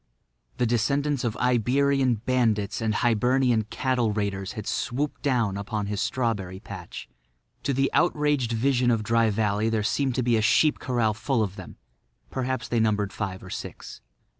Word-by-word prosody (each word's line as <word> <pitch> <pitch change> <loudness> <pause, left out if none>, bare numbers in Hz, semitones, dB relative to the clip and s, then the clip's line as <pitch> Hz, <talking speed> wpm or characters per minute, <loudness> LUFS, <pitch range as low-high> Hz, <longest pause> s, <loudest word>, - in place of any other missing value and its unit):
The 125 - +1
descendants 140 +5 +1
of 120 -2 -2
Iberian 125 +2 +2
bandits 110 -3 0
and 110 -1 0
Hibernian 120 0 +2
cattle 125 -1 0
raiders 100 -2 -2
had 110 - -6
swooped 140 +4 -2
down 120 -8 +1
upon 105 +1 -3
his 100 0 -2
strawberry 105 -7 -2
patch. 95 - -9 0.5
To - - -1
the 135 +1 +1
outraged 150 -7 +2
vision 125 +2 +2
of 115 -3 +1
Dry 115 0 +2
Valley 105 +1 0
there 110 -2 0
seemed 130 +3 0
to 130 - 0
be 120 -1 +3
a - - +1
sheep 150 +7 +3
corral 120 -4 0
full 115 +2 0
of 100 -2 -4
them; 95 -4 -10 0.5
perhaps 130 -1 -2
they 120 - 0
numbered 105 -3 +1
five 95 -3 -4
or 95 - -10
six. - - -8
115 Hz, 165 wpm, -26 LUFS, 105-130 Hz, 0.5 s, be